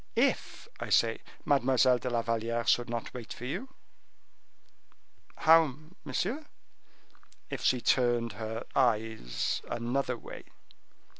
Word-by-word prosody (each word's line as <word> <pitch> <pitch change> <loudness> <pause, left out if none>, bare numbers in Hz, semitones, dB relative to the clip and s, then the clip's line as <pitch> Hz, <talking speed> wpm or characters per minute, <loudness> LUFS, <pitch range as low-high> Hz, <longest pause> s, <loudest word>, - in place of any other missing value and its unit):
If, - - 0
I - - -5
say, - - +3 0.3
Mademoiselle 130 -2 +4
de 125 - -3
la 120 -1 0
Valliere 115 0 -1
should 120 0 +2
not 115 -2 -4
wait 120 -2 -8
for 125 - -7
you?" 185 - -4 1.7
"How, 160 -4 +5 0.3
monsieur?" 290 +7 -2 1.1
"If - - -4
she 125 -2 +2
turned 120 -2 +2
her 110 +1 -5
eyes 110 - 0
another 125 +2 -1
way." - - -10
120 Hz, 115 wpm, -30 LUFS, 115-130 Hz, 1.7 s, How